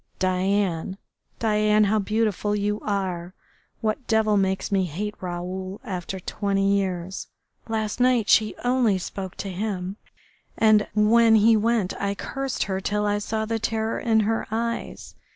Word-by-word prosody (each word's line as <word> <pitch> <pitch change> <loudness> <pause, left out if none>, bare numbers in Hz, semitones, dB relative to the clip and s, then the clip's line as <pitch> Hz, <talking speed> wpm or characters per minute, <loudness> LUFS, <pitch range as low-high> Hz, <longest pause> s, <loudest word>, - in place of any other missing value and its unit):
Diane, 185 -1 0 0.4
Diane, 215 -1 +3
how 210 +1 +2
beautiful 210 0 0
you 210 +1 -1
are!... 185 -3 -3 0.5
What 220 +3 -2
devil 220 -2 +3
makes 190 0 0
me 195 -2 +2
hate 200 +6 -4
Raoul 185 +2 -5
after 185 -1 -5
twenty 195 +1 0
years? 190 -2 -2 0.4
Last 220 0 -2
night 245 -3 +3
she 215 -1 +4
only 245 -5 +2
spoke 190 0 -6
to 195 - -5
him, 190 0 -3 0.6
and 215 -1 +4
when 225 +2 +5
he 220 +1 +6
went 220 -3 +1
I 200 0 -1
cursed 270 +4 -3
her 190 -1 -3
till 210 +2 -1
I 205 0 +1
saw 220 +1 -2
the 225 +1 -2
terror 225 0 -1
in 220 -2 +3
her 225 +2 -1
eyes. 230 +1 -3
210 Hz, 145 wpm, -24 LUFS, 190-220 Hz, 0.6 s, he